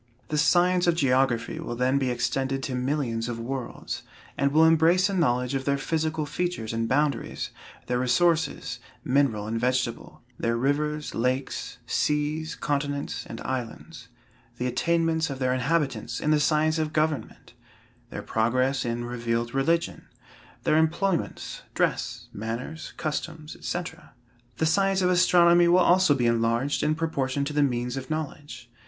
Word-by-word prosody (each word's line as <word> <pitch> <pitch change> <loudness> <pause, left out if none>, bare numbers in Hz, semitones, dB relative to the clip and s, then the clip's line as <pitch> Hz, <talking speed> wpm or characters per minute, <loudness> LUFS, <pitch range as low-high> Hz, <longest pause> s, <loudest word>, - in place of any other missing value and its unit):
The 155 - -1
science 180 +2 +3
of 170 - +4
geography 130 -5 +1
will 120 - -4
then 130 +3 +2
be 130 -2 0
extended 130 +3 -1
to 135 - -3
millions 125 -3 -1
of 115 -1 -4
worlds, 125 +1 -5 0.3
and 140 0 +1
will 160 +2 +5
embrace 165 +4 +4
a - - -2
knowledge 125 -7 +1
of 135 -1 -2
their 140 0 +2
physical 155 +1 -1
features 160 -9 -3
and 115 0 -1
boundaries, 145 +1 0 0.3
their 125 0 0
resources, 165 +6 +1 0.2
mineral 125 -6 +1
and 115 +1 -2
vegetable; 125 -1 -2 0.2
their 115 0 0
rivers, 150 +4 -1
lakes, 130 +3 -2
seas, 150 +2 -1
continents 145 0 -2
and 115 - -7
islands; 125 -3 -5 0.5
the 125 - -2
attainments 160 +4 +1
of 135 - -4
their 130 -1 +1
inhabitants 135 -3 -1
in 150 - 0
the 155 - +4
science 155 +1 +2
of 155 0 -2
government; 155 -2 -2 0.6
their - - -6
progress 130 +4 +1
in 120 0 -2
revealed 120 -1 -2
religion; 165 +5 0 0.6
their 155 - +3
employments, 170 +3 -1
dress, - - -1
manners, 115 +9 -5
customs, 155 0 -4
&c. 175 - -1 0.8
The 160 - +1
science 195 +3 +2
of 180 - +3
astronomy 175 -1 +5
will 175 +1 +5
also 180 -3 +5
be 125 -3 0
enlarged 115 +4 +1
in 155 - +1
proportion 140 -4 -1
to 150 - -4
the 145 - +2
means 125 -2 0
of 130 -1 -6
knowledge. 145 -5 -5
140 Hz, 150 wpm, -26 LUFS, 125-160 Hz, 0.8 s, will